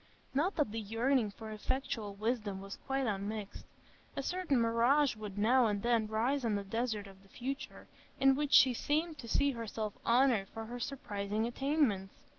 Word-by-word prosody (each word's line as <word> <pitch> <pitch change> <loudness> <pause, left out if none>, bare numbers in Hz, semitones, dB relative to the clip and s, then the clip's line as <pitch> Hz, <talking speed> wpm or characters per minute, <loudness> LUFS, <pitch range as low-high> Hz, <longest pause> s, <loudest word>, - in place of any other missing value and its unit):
Not 315 +9 +1
that 295 -9 +1
the 225 - -3
yearning 225 +2 +1
for 220 +2 -9
effectual 215 -2 -3
wisdom 210 -2 -2
was 195 +1 -8
quite 270 0 0
unmixed; 205 -1 -4 0.5
a 275 - -2
certain 360 -5 0
mirage 235 +5 +3
would 210 -2 -7
now 235 +4 +4
and 205 -2 -1
then 235 -2 +2
rise 240 +6 0
on 225 -3 +1
the 200 - -2
desert 220 0 -2
of 195 -1 -14
the 195 - -22
future, 270 +6 -6 0.3
in 270 0 +6
which 290 +1 -1
she 255 -3 +7
seemed 305 +5 -1
to 235 - -8
see 280 +3 +3
herself 220 -3 -4
honoured 235 -5 +3
for 225 0 -7
her 245 +2 -6
surprising 210 -5 -2
attainments. 240 -6 0
230 Hz, 175 wpm, -33 LUFS, 210-270 Hz, 0.5 s, she